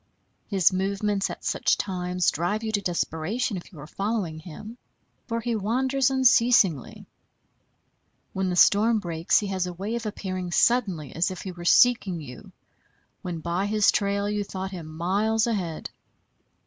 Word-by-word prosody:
His 190 -2 +3
movements 195 +1 -1
at - - -8
such - - +1
times 180 -2 -1
drive 190 +7 -2
you 220 - -2
to 205 -2 0
desperation, 185 +6 -2
if 180 - -8
you 165 - -13
are 145 - -8
following 195 -3 -3
him; 205 +9 -10 0.5
for 230 -2 -2
he 235 0 -1
wanders 260 +6 +1
unceasingly. 240 - +3 1.3
When 190 -1 -1
the 180 - -1
storm 220 +5 +5
breaks 170 -4 0
he - - -3
has 185 -2 -1
a 180 - -5
way 195 +6 -5
of 235 -2 -3
appearing 185 -3 -4
suddenly, 190 - +1
as 170 +3 +1
if 185 - -7
he 190 - -5
were 175 -1 -10
seeking 200 -4 +4
you, 125 -5 -11 0.7
when 170 -3 -5
by 175 +4 -1
his 210 0 +3
trail 200 0 0
you 210 0 -1
thought 190 -1 -6
him 175 -4 -7
miles 200 +8 0
ahead. 185 -9 -3
195 Hz, 160 wpm, -25 LUFS, 175-215 Hz, 1.3 s, storm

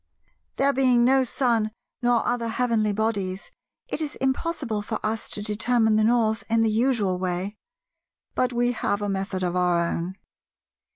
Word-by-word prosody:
There 280 +1 +2
being 255 -3 +4
no 265 +1 +4
sun 235 -3 +1 0.3
nor 240 -1 +2
other 240 -1 0
heavenly 225 -2 +1
bodies, 200 -3 -2 0.4
it - - -2
is 300 -2 -3
impossible 265 -4 -1
for 215 +1 -4
us 220 +1 -2
to 205 - -3
determine 220 +1 +2
the 215 - +3
North 220 -1 +2
in 225 0 +3
the 220 - +2
usual 215 -5 +1
way; 185 +3 -2 0.8
but 255 0 +1
we 245 0 +1
have 205 -3 -1
a 205 - -1
method 190 -1 -2
of 180 0 -1
our 180 -1 +2
own. 170 +2 -2
220 Hz, 160 wpm, -25 LUFS, 200-245 Hz, 0.8 s, being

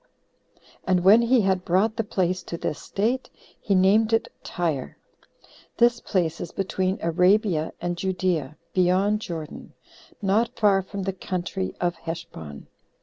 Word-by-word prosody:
And 185 -1 +1
when 205 +5 +7
he 235 +1 +4
had 190 -2 +1
brought 195 +6 +2
the 225 - -1
place 185 -3 -1
to 170 - -5
this 150 - -4
state, 235 +6 -1 0.3
he 200 - +1
named 210 +4 +4
it 225 - +2
Tyre. 155 - -3 0.8
This 235 0 +4
place 170 -5 -1
is 170 - -6
between 190 0 -1
Arabia 180 0 +2
and 175 0 -2
Judea, 175 -6 -1 0.2
beyond 190 +3 +2
Jordan, 160 -6 -7 0.5
not 210 +4 +1
far 200 -3 +4
from 195 +1 -6
the 195 0 -2
country 185 +1 -4
of 175 -1 0
Heshbon. 160 - -8
185 Hz, 140 wpm, -25 LUFS, 175-205 Hz, 0.8 s, when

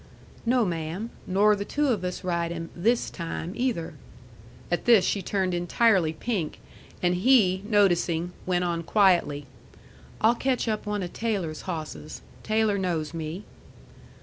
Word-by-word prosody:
"No, 245 -1 +3
ma'am. 170 +5 -3 0.2
Nor 205 +3 +4
the 200 - -3
two 290 +6 0
of 215 -7 0
us 180 0 -4
ride 170 -2 -1
him 165 -1 -6
THIS 230 +7 +1
time, 170 +1 -5
either." 230 -11 -1 0.8
At 175 - 0
this 230 -6 +6
she 200 - 0
turned 190 0 -1
entirely 175 0 +3
pink, 180 -2 -3 0.4
and 175 0 +3
he, 190 -2 +4
noticing, 175 -4 +2 0.2
went 180 -1 +1
on 170 -1 -1
quietly: 170 -7 +2 0.7
"I'll 225 +2 +5
catch 255 0 -1
up 215 -1 -2
one 210 -2 -1
of 175 - -6
Taylor's 195 -9 -2
hawsses. 155 - -6 0.2
Taylor 215 -2 +1
knows 165 -4 -2
me." 165 +4 -5
185 Hz, 145 wpm, -26 LUFS, 170-215 Hz, 0.8 s, this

